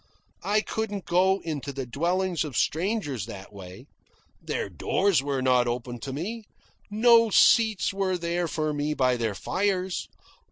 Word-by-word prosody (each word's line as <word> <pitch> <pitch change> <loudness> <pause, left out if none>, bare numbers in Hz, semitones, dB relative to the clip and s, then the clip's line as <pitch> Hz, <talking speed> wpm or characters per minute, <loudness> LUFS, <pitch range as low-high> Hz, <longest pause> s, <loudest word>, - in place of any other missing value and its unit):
I 210 +1 +1
couldn't 205 -4 -4
go 190 +2 +2
into 145 -4 -4
the 135 -1 -5
dwellings 175 +7 -1
of 145 -7 -5
strangers 160 - -1
that 100 -3 -10
way. 95 -2 -11 0.6
Their - - -3
doors 195 -7 +1
were 135 -2 -2
not 125 -1 +3
open 120 0 -4
to 135 - -6
me; 210 - -5 0.4
no 230 +2 +5
seats 215 -4 +4
were 190 -2 0
there 170 0 -1
for 155 -2 -2
me 150 +1 -2
by 130 -3 +2
their 115 -4 -2
fires. 185 - -1
170 Hz, 150 wpm, -26 LUFS, 130-195 Hz, 0.6 s, no